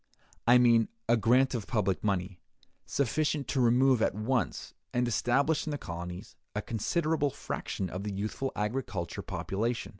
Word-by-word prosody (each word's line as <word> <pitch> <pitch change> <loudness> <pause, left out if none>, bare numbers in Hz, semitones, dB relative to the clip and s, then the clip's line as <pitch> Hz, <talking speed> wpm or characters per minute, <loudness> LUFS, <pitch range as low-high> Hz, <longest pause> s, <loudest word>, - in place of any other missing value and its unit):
I 120 +1 +8
mean, 120 -2 +5 0.2
a 115 - +5
grant 125 +4 +3
of 115 -5 -3
public 100 -6 0
money, 95 -3 -1 0.5
sufficient 140 +1 0
to 130 +3 +1
remove 125 +1 +4
at - - +2
once, 115 +3 -1 0.2
and 125 0 +1
establish 140 +7 +1
in - - 0
the 145 - -2
colonies, 90 -2 -7 0.2
a 105 - -1
considerable 150 - 0
fraction 95 -6 -4
of 90 +2 -5
the 105 - -3
youthful 105 +7 -3
agricultural 105 -5 -3
population. 115 +4 -2
115 Hz, 150 wpm, -30 LUFS, 100-135 Hz, 0.5 s, I